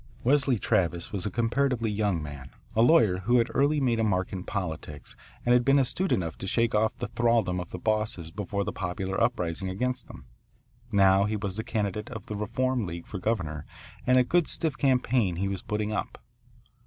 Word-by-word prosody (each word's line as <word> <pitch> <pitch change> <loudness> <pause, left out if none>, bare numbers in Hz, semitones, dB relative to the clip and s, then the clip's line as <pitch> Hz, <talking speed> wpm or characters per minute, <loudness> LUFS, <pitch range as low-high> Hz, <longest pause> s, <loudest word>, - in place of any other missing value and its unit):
Wesley 135 -1 +3
Travis 90 -5 0
was 100 0 -2
a - - -1
comparatively 120 +1 0
young 100 -6 0
man 70 -3 -8 0.3
a 110 - +4
lawyer 115 - +5
who 120 +6 +2
had 115 0 +2
early 145 +2 +3
made 120 -4 +1
a - - +2
mark 95 -4 0
in 95 -1 -4
politics 80 -8 -5 0.3
and 120 - +4
had 125 0 +4
been 135 +3 +4
astute 160 +8 +1
enough 85 -3 0
to 95 - -5
shake 115 +3 +1
off 110 +1 +1
the - - -3
thraldom 115 -6 +1
of 90 - -6
the - - -6
bosses 105 -5 -1
before 100 +1 -3
the - - -3
popular 95 +1 -3
uprising 90 +2 0
against 125 +7 -2
them. - - -12 0.7
Now 95 -1 +5
he 105 +1 -1
was 100 -2 -3
the 110 - -3
candidate 105 -1 -2
of 110 -5 -7
the 105 - -5
Reform 120 +2 -1
League 85 0 -6
for 100 - -6
governor 90 -8 -2 0.4
and 130 0 +5
a 125 - +6
good 170 +5 +2
stiff 160 -4 -1
campaign 125 -8 +2
he 95 +3 -1
was 95 -1 -3
putting 105 0 -2
up. - - -3
105 Hz, 200 wpm, -27 LUFS, 95-120 Hz, 0.7 s, a